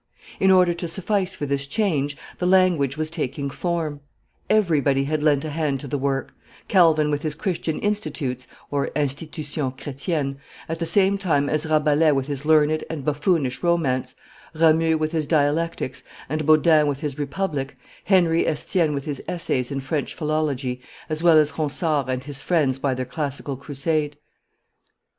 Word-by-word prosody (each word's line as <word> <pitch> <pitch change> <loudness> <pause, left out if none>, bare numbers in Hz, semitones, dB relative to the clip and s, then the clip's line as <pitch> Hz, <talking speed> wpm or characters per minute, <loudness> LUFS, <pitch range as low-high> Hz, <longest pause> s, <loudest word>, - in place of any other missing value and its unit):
In 190 - +4
order 180 -2 +5
to 170 0 -5
suffice 190 +2 -1
for 145 - -4
this 140 0 -2
change, 145 -5 0 0.2
the 180 - 0
language 180 -7 +3
was 155 0 -2
taking 140 -3 -3
form; 165 -4 -2 0.5
everybody 150 -10 +3
had 155 +2 -1
lent 150 -1 +2
a 155 - -4
hand 145 -3 -1
to 145 - -7
the 145 +1 -2
work; 135 0 -2 0.3
Calvin 160 -5 +4
with 145 0 -1
his 155 -1 -2
Christian 165 -3 -2
Institutes 150 -11 -2 0.5
(Institution 145 -1 -2
Chretienne) 140 +1 -3 0.3
at 165 +1 -4
the 165 - -2
same 195 +3 +3
time 145 -7 +1
as 155 +1 0
Rabelais 155 0 +3
with 135 -1 0
his 140 0 -4
learned 155 0 +3
and 150 -5 -5
buffoonish 150 -3 0
romance, 140 -8 0 0.4
Ramus 160 0 +4
with 155 0 -1
his 160 -3 -1
Dialectics, 150 -3 0 0.3
and 155 +1 -2
Bodin 155 -1 +5
with 140 0 -2
his 150 -2 -3
Republic, 145 -3 -3 0.3
Henry 170 -4 +3
Estienne 160 0 0
with 140 - -4
his 145 -3 -4
essays 165 -8 -1
in 140 -1 -3
French 140 +2 -3
philology, 145 -5 -1 0.3
as 155 0 -2
well 170 -2 +6
as 150 -1 +4
Ronsard 150 -2 0
and 130 0 -2
his 140 -1 -5
friends 145 -7 +1
by 135 -1 0
their 130 0 -3
classical 140 0 -3
crusade. 145 +2 -2
150 Hz, 160 wpm, -23 LUFS, 140-165 Hz, 0.5 s, well